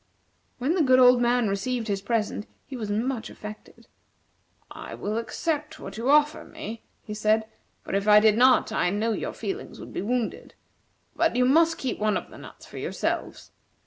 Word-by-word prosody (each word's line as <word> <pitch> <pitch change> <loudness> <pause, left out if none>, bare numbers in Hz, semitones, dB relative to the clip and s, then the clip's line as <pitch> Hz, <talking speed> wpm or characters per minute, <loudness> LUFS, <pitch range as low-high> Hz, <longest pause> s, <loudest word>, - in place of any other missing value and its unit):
When 265 +6 0
the 360 - +2
good 260 -3 +5
old 250 -1 +6
man 240 -1 +2
received 225 +4 -2
his 200 -2 -1
present, 215 0 -2 0.2
he 270 - -8
was 220 -4 -5
much 230 +3 -2
affected. 210 0 -11 0.9
"I - - -8
will 215 +2 -2
accept 300 +6 -3
what 195 - -8
you 230 +4 -2
offer 300 +1 +4
me," 310 -8 -8 0.2
he 210 - -7
said; 215 +1 +2 0.4
"for - - -7
if 200 +1 0
I 210 0 +8
did 215 0 +4
not, 255 0 +4
I 195 - +1
know 210 +4 0
your - - -3
feelings 390 +2 -6
would - - -10
be - - -3
wounded. 235 +2 -3 0.6
But 330 -7 +1
you 250 0 +3
must 325 +5 +4
keep 260 - -3
one 215 -1 +1
of - - -8
the - - -12
nuts - - -12
for - - -9
yourselves. - - -3
235 Hz, 185 wpm, -26 LUFS, 215-260 Hz, 0.9 s, I